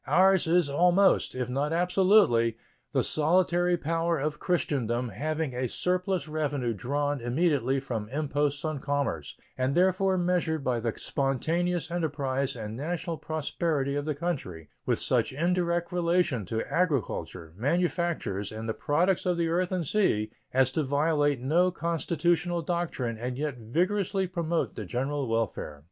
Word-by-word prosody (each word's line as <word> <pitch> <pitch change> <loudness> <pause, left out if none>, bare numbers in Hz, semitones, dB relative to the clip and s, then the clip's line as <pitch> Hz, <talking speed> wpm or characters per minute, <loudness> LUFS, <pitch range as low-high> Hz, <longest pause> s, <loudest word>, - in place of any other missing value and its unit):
Ours 190 -1 +4
is 170 -1 +3
almost, 180 +6 +3
if 125 -2 -2
not 140 +4 -1
absolutely, 180 - +4 0.3
the - - +2
solitary 175 +2 +2
power 165 +1 0
of 150 +1 -2
Christendom 125 - 0
having 155 +6 -2
a 125 0 -2
surplus 180 - -1
revenue 145 -6 -1
drawn 145 +5 -1
immediately 135 0 +1
from 115 -6 -4
imposts 145 +1 -1
on 155 -2 -2
commerce, 135 - -2 0.2
and 130 +2 +1
therefore 185 +1 +3
measured 175 -4 0
by 125 -2 0
the 115 -1 -3
spontaneous 165 +5 -1
enterprise 140 -5 -1
and 110 -2 -6
national 165 +4 -3
prosperity 155 -2 -1
of 145 0 -2
the 155 -2 -1
country, 130 - -4 0.2
with - - +2
such - - +1
indirect 170 +2 0
relation 170 - +1
to 110 +2 -1
agriculture, 135 - -1
manufactures, 165 - -1
and 110 +1 -6
the 110 - -1
products 170 - +1
of 180 -1 +1
the 170 -1 +1
earth 180 +2 0
and 180 -3 -1
sea 110 - +1 0.2
as 130 0 +3
to 155 - 0
violate 145 0 +1
no 170 +8 +3
constitutional 170 0 0
doctrine 155 -9 -2
and 125 +1 -3
yet 145 -3 -3
vigorously 185 - 0
promote 170 -2 -1
the 110 - -6
general 135 +7 -2
welfare. 110 -9 -2
150 Hz, 145 wpm, -28 LUFS, 130-175 Hz, 0.3 s, Ours